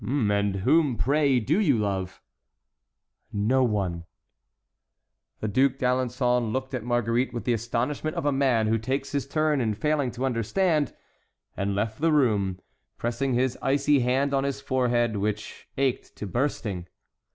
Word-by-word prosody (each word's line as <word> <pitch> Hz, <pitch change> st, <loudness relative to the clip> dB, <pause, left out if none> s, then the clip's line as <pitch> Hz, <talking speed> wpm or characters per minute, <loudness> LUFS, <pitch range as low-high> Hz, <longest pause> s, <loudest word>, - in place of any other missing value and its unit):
"And 105 Hz, -6 st, +1 dB
whom, 145 Hz, -, +3 dB
pray, 140 Hz, -1 st, +2 dB
do 145 Hz, -, +1 dB
you 145 Hz, -, +3 dB
love?" 95 Hz, -3 st, -3 dB, 1.1 s
"No 115 Hz, +5 st, +2 dB
one." 95 Hz, -7 st, -1 dB, 1.4 s
The 110 Hz, -, -1 dB
Duc 130 Hz, +6 st, +3 dB
d'Alençon 125 Hz, -2 st, 0 dB
looked 130 Hz, +2 st, -3 dB
at 125 Hz, -4 st, -3 dB
Marguerite 120 Hz, +1 st, 0 dB
with 120 Hz, -, -3 dB
the 125 Hz, -, +1 dB
astonishment 120 Hz, +7 st, -2 dB
of -, -, -3 dB
a 145 Hz, -, +3 dB
man 130 Hz, -5 st, +2 dB
who 110 Hz, +1 st, +1 dB
takes 130 Hz, +5 st, -2 dB
his 140 Hz, -2 st, -2 dB
turn 155 Hz, -1 st, +1 dB
in 110 Hz, -3 st, 0 dB
failing 145 Hz, +3 st, 0 dB
to 125 Hz, +2 st, -2 dB
understand, 145 Hz, -, 0 dB, 0.6 s
and 100 Hz, 0 st, -1 dB
left 110 Hz, +4 st, -2 dB
the 165 Hz, 0 st, +3 dB
room, 105 Hz, -10 st, +2 dB, 0.4 s
pressing 120 Hz, +2 st, -1 dB
his 130 Hz, 0 st, 0 dB
icy 140 Hz, +1 st, +3 dB
hand 130 Hz, +3 st, +1 dB
on 135 Hz, 0 st, +2 dB
his 140 Hz, -1 st, -2 dB
forehead, 120 Hz, -4 st, +1 dB
which 105 Hz, +1 st, -4 dB
ached 135 Hz, -2 st, -1 dB
to -, -, -6 dB
bursting. 105 Hz, -6 st, -2 dB
125 Hz, 150 wpm, -26 LUFS, 110-140 Hz, 1.4 s, whom